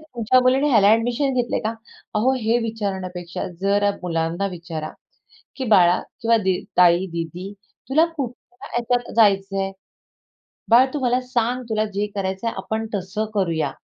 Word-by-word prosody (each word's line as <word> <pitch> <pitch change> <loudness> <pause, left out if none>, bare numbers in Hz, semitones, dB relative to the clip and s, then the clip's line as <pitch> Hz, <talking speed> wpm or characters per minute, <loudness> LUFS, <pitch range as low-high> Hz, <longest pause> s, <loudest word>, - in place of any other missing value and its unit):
"तुमच्या 255 -5 +1
मुलीने 260 +3 +3
ह्याला 210 -5 +5
ॲडमिशन 240 +5 +2
घेतलंय 245 -1 0
का?" 220 - 0 0.4
अहो 230 +5 +3
हे 225 +2 +2
विचारण्यापेक्षा 190 -6 -4
जरा 200 +1 +2
मुलांना 170 +2 -1
विचारा, 165 -3 -6 0.7
की 265 - -3
"बाळा 180 -6 +5 0.2
किंवा 230 0 +4
दी 190 -3 0 0.2
ताई, 180 +1 +5
दीदी, 170 +4 -5 0.4
तुला 305 +5 +4
कुठल्या 250 -2 -7
ह्याच्यात 240 0 -1
जायचंय? 195 -2 +2 1.0
बाळ 240 +3 +7
तू 295 - -2
मला 250 0 +2
सांग 250 0 -1
तुला 215 -1 +1
जे 205 +1 -1
करायचंय 195 +3 -2
आपण 220 +3 -3
तसं 200 +3 -3
करूया." 170 -6 0
215 Hz, 140 wpm, -22 LUFS, 190-240 Hz, 1.0 s, बाळ